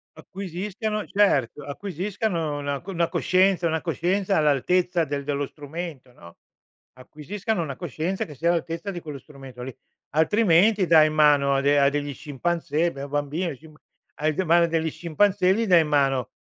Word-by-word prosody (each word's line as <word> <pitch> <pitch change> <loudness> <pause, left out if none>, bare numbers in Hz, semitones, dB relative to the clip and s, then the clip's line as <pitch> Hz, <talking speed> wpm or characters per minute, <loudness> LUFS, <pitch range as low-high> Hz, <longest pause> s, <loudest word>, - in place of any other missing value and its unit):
Acquisiscano 200 +3 -5
certo, 150 - +1
acquisiscano 175 -1 -3
una 140 -1 -3
c 195 - -10
una 170 -1 0
coscienza 185 -1 +2
una 160 -1 0
coscienza 185 +3 0
all'altezza 170 +4 +2
del 140 -1 -4
dello 140 -1 -2
strumento, 150 -3 -8
no, 85 -7 -16 0.6
acquisiscano 170 - -4
una 140 -4 -5
coscienza 175 +4 -3
che 150 - -11
sia 170 +6 0
all'altezza 170 +2 -2
di 175 - -6
quello 150 -3 -7
strumento 135 -4 -12
lì. 130 -1 -7 0.4
Altrimenti 190 +4 +3
dai 155 -2 +6
in 155 - -3
mano 145 -2 +4
a 135 - +1
de 145 +1 +3
a 140 - +5
degli 145 0 -3
scimpanzé 165 +3 -2
beh 135 - -9
un 140 - -7
bambino, 145 +3 -2
scim 155 +3 -17 0.5
hai 155 +1 +1
de 190 - 0
mano 170 0 +4
degli 160 -1 -1
scimpanzé 185 +2 +2
gli 230 - 0
dai 180 -5 +5
in 155 - -2
mano 135 -4 +1
160 Hz, 170 wpm, -24 LUFS, 145-180 Hz, 0.6 s, dai